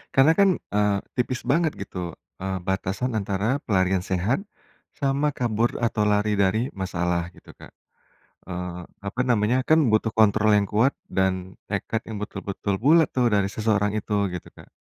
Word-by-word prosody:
Karena 135 +4 +6
kan, 200 - +6 0.3
eee, 105 -1 +3 0.2
tipis 125 0 -1
banget 165 0 +2
gitu, 90 -3 -5 0.3
eee, 95 0 -2
batasan 95 +6 -1
antara 105 +5 0
pelarian 95 -2 +1
sehat 95 - 0 0.6
sama 140 +1 +1
kabur 120 -2 -1
atau 110 -2 +1
lari 105 0 +2
dari 100 +5 +2
masalah 90 -1 -1
gitu, - - -15
Kak. - - -14 0.8
Eee, 90 -1 -5 0.2
apa 100 +5 -3
namanya, 120 -1 +2
kan 155 +4 +4
butuh 110 +1 +2
kontrol 110 0 +4
yang 100 -1 +2
kuat 115 +8 +2
dan 95 -1 -1
tekad 110 +2 -2
yang 110 -2 -5
betul-betul 100 -1 -3
bulat 160 +1 +5
tuh 125 -1 +3
dari 100 -1 +2
seseorang 105 -2 +1
itu, 105 0 -3 0.2
gitu, 90 - -6
Kak. - - -16
105 Hz, 155 wpm, -24 LUFS, 95-120 Hz, 0.8 s, Karena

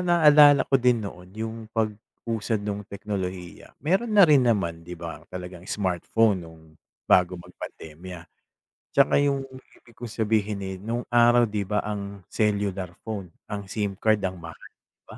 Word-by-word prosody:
naalala 150 -5 +6
ko 135 - +2
din 120 -3 +2
noon 90 -2 -9
'yong 110 +1 -4 0.2
pag-usad 110 0 -3
nung 105 -1 -3
teknolohiya. 95 -4 -6
Meron 195 +8 +1
na 200 - +10
rin 150 -4 +6
naman, 85 -7 0
'di 90 0 -7
ba, 85 -1 -7
talagang 90 0 -8
smartphone 100 +2 +1
no'ng 80 -1 -15 0.4
bago 90 0 +3
mag 85 - -13
pandemya. 85 +2 -9 0.7
Tsaka 140 -1 +4
'yong 140 -1 +1 0.3
ibig 115 - -21
kong 120 -2 -7
sabihin, 105 -2 0
eh, 95 0 -4
no'ng 115 +5 -4
araw, 120 -1 +5
'di 105 -1 -2
ba 105 +1 0
ang 100 -1 -5
cellular 100 -4 -1
phone, 100 -6 -6 0.2
ang 100 -1 -5
SIM 100 -1 -3
card 110 -1 +2
ang 95 -1 -3
mahal, 85 -2 -10 0.2
'di - - -69
ba? - - -10
105 Hz, 160 wpm, -25 LUFS, 95-120 Hz, 0.7 s, na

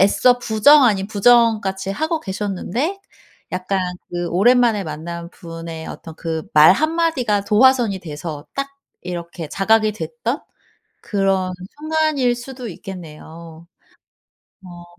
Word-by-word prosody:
애써 245 +6 +4
부정 245 +5 +5
아닌 200 -4 +2
부정 225 +1 +4
같이 190 0 -3
하고 315 +9 -1
계셨는데 210 - -3 0.5
약간 185 +1 -1 0.3
그 175 0 -3
오랜만에 225 +1 +3
만난 170 +2 -6
분의 165 -2 -8
어떤 160 - -9
그 160 -1 -3
말 155 +3 +8
1 310 +9 0
마디가 260 -12 +1
도화선이 230 -2 +3
돼서 150 -2 -7
딱 275 0 -2 0.3
이렇게 170 -3 -6
자각이 215 +3 +2
됐던 475 - -4 0.6
그런 195 -2 0 0.3
순간일 310 -5 +1
수도 245 0 -8
있겠네요. 165 -2 -10 1.0
어. 175 -1 -11
195 Hz, 245 characters per minute, -20 LUFS, 170-245 Hz, 1.0 s, 말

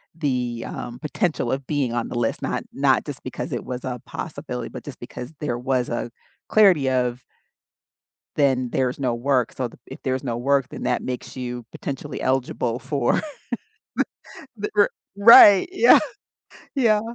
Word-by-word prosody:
the, 125 -6 -2
um, 120 0 -6
potential 155 - -1
of 135 0 -2
being 140 -6 0
on 120 -1 -1
the - - -6
list, 115 - -1
not - - -2
not - - +3
just - - -7
because - - -5
it - - -3
was 125 -1 -5
a 125 -2 -4
possibility, 140 -7 -6
but - - -9
just 145 - -9
because 125 +3 -8
there 120 -5 -2
was 130 -1 0
a 120 0 -3 0.4
clarity 180 -11 +5
of 125 -1 0 1.1
then 130 -4 +2
there's 130 +1 0
no 125 -3 0
work, 125 -1 +1
so 130 -2 -2
th - - -18
if - - -10
there's 130 0 -1
no 120 -3 -2
work, 135 +1 +1
then - - -7
that 125 - 0
makes 125 +1 -5
you 125 -2 -5
potentially 135 -2 -6
eligible 130 -2 0
for 130 0 0 1.4
the 210 0 -3
the - - -17
r 205 - +5 0.3
Right, 205 - +9
yeah, 425 +5 +7 0.8
yeah. 220 -5 +3
130 Hz, 165 wpm, -23 LUFS, 125-145 Hz, 1.4 s, Right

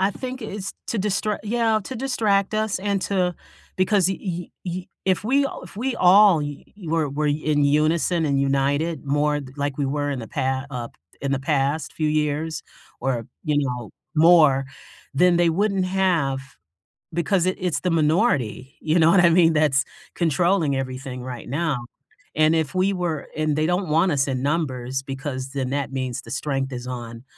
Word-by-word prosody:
I 190 +1 +3
think 255 +4 -6
it's 205 -3 -5 0.2
to 230 - -1
distra 210 +1 0
yeah, 220 0 +1
to 260 - -6
distract 215 -6 +1
us 215 -3 0
and 200 0 -1
to 180 -3 0 0.4
because 185 0 +3
y 190 - -1
y 175 -2 -4 0.2
y 180 0 -4 0.2
if 190 0 +1
we 275 +4 +3 0.2
if 180 - -14
we 255 +4 -1
all 190 -1 +6
y 145 -1 -5 0.2
were 160 -1 +1
were 150 +2 -1
in 150 0 +1
unison 155 +4 +2
and 140 -2 +1
united 140 +3 0
more 145 +1 +1 0.2
like 145 -1 -2
we 145 - -1
were 145 +1 -1
in 135 - -3
the 115 - -8
pa 130 0 -1
up, 120 -3 -6 0.2
in 140 0 -1
the 140 - +1
past 140 +1 0
few 155 -1 -1
years 150 +1 -1 0.4
or, 125 -4 -1 0.2
you 150 -2 +1
know, 125 -6 -3 0.2
more, 155 -4 +6 0.5
then 175 +4 +4
they 170 -1 +3
wouldn't 195 +1 +1
have 180 -8 +1 0.7
because 175 +2 +1
i - - +4
it's 180 -6 -1
the 180 - -1
minority. 150 - +1
You 160 +2 +2
know 160 0 +6
what 180 - +6
I 170 - +6
mean? 165 -1 +5
That's 150 -3 +3 0.3
controlling 170 -2 +1
everything 130 -1 -5
right 125 -2 -7
now. 150 0 0 0.6
And 155 +1 +4
if 160 -2 -1
we 190 +2 +2
were 175 -5 -2
and 155 -1 0
they 155 0 +1
don't 180 +1 0
want 165 +4 +3
us 140 -1 +1
in 130 -1 -2
numbers 135 -4 -1
because 135 -1 -5
then 130 -2 -2
that 140 -1 -2
means 130 -2 -3
the 115 - -12
strength 135 0 -2
is 120 0 -6
on 120 -1 -7
155 Hz, 180 wpm, -23 LUFS, 135-185 Hz, 0.7 s, all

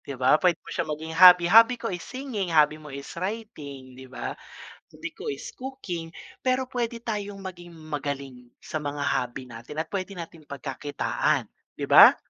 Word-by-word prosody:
Di 140 - -7
ba 130 +4 +4
puwede 180 -2 +4
mo - - -10
siya - - -1
maging 160 +2 -4
hobby. 180 +1 +9
Hobby 230 +2 +8
ko 230 -4 -4
is 175 - -4
singing, 255 -8 -4
hobby 155 -1 +4
mo 150 - -11
is 140 0 -8
writing, 155 - -6
'di 130 +1 -12
ba? 130 - -5 0.6
Hobby 320 0 -7
ko 435 +6 -7
is - - -5
cooking, 230 -11 -6 0.3
pero 260 -1 +1
puwede 240 -2 -3
tayong 205 -3 -3
maging 175 -2 -8
magaling 140 -5 -5
sa 155 - -5
mga 145 -1 -3
hobby 130 -3 -1
natin 120 +4 -10
at 160 - -3
pwede 195 0 -3
nating 165 -3 -9
pagkakitaan, 140 +1 -1 0.3
'di - - -3
ba? - - +10
165 Hz, 175 wpm, -26 LUFS, 140-215 Hz, 0.6 s, ba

